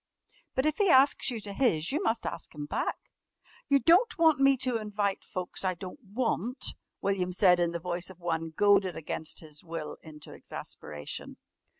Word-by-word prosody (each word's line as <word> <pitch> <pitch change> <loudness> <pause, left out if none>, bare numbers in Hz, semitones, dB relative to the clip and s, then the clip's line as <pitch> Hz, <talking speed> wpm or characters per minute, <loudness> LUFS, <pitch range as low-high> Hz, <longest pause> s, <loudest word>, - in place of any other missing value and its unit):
"But 260 - +1
if 310 -1 +1
he 405 -2 +4
asks 275 -1 +5
you 240 -3 -3
to 200 -1 -7
his 175 - +2
you 300 +6 0
must 230 - 0
ask - - -5
him 145 -1 -5
back." - - -3 0.6
"You 280 - +6
don't 370 - +4
want 320 -4 +5
me 275 0 +5
to 250 -1 0
invite 205 -2 -2
folks 185 +1 -4
I 185 -1 0
don't 180 +5 -9
want?" 235 +4 -1 0.3
William 190 -2 0
said 180 -1 +5
in 170 -1 +2
the 170 - -3
voice 175 +1 -4
of 185 -1 -13
one 165 -2 -2
goaded 195 +1 +3
against 160 0 -4
his 150 -2 -10
will 165 -2 -6
into 150 -2 -11
exasperation. 75 -1 -6
195 Hz, 180 wpm, -29 LUFS, 170-255 Hz, 0.6 s, You